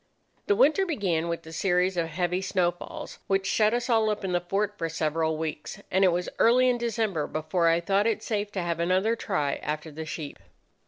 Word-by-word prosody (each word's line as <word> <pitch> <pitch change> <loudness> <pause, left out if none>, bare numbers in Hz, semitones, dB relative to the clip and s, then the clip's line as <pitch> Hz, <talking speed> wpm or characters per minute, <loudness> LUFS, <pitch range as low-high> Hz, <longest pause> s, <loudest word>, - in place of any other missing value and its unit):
"The 410 - +4
winter 390 -4 +4
began 190 - -1
with 170 -1 -4
a 160 - -10
series 180 +2 +1
of 170 -2 0
heavy 180 +2 -1
snowfalls 175 -2 -2
which 195 0 +1
shut 215 +2 +3
us 240 0 -1
all 225 -3 +3
up 210 -1 -2
in 185 - -2
the 175 0 +1
fort 200 +3 -1
for 165 -4 -3
several 160 0 -1
weeks, 155 -1 -5
and 190 +1 +3
it - - +7
was 175 +1 -1
early 255 +2 +5
in 245 -1 +1
December 220 -9 -1
before 155 +2 0
I 165 0 +4
thought 200 +4 +1
it 225 - -1
safe 205 -2 -2
to 185 - -2
have 170 -1 -2
another 185 +6 +2
try 150 -11 -1
after 150 +1 -4
the 160 +1 -7
sheep. 150 -2 -6
180 Hz, 210 wpm, -27 LUFS, 165-210 Hz, -, it